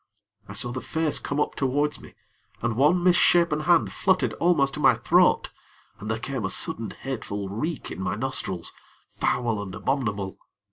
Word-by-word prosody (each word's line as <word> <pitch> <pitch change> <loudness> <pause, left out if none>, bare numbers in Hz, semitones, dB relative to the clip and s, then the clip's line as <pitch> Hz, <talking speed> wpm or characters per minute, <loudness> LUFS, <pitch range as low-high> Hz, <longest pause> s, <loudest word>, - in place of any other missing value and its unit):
I - - -6
saw 115 +4 0
the 130 +1 -4
face 160 -2 0
come 140 - -3
up - - 0
towards 145 +2 -1
me, - - -14 0.5
and 120 -1 0
one 150 +8 +3
misshapen 175 -3 +4
hand 170 +1 +2
fluttered 190 -1 +1
almost 155 -6 +2
to - - -5
my - - +5
throat, - - +3 0.5
and 105 - -7
there 110 - 0
came 130 0 -4
a 95 - -1
sudden, 110 +2 -2
hateful 105 -7 -5
reek 145 - -4
in - - -6
my 95 - -1
nostrils 105 -7 -3 0.4
foul 115 -4 -1
and 95 -2 -7
abominable. 105 -8 -2
130 Hz, 170 wpm, -25 LUFS, 105-150 Hz, 0.5 s, my